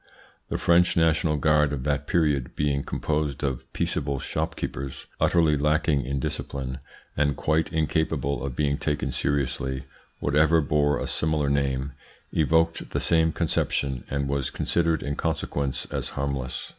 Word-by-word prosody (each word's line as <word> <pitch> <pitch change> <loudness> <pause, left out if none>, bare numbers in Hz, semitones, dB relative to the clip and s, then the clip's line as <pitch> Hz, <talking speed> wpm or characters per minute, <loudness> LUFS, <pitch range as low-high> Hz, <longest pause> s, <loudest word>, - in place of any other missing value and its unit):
The - - -1
French 85 +1 +4
national 80 -1 +3
guard 75 0 +3
of 70 -3 -3
that 70 0 -1
period, 75 -7 +1
being 70 -1 +1
composed 75 -3 -2
of 65 -3 -3
peaceable 70 0 -1
shopkeepers, 70 0 -4
utterly 80 -3 +4
lacking 75 -1 +1
in 70 0 -1
discipline 65 0 -4 0.4
and 70 -1 +1
quite 80 +1 +1
incapable 75 -4 0
of 70 -3 -4
being 70 0 0
taken 75 -1 -1
seriously, 65 -1 -1 0.4
whatever 75 +3 +3
bore 75 -1 +2
a - - -3
similar 75 -2 0
name, 70 -1 0 0.4
evoked 80 +1 +2
the - - -1
same 80 -1 +3
conception 65 -4 0
and 70 0 -1
was 70 -1 0
considered 85 -2 0
in 70 0 -2
consequence 70 -4 -1
as - - -2
harmless. 70 -2 -3
70 Hz, 140 wpm, -26 LUFS, 70-80 Hz, 0.4 s, French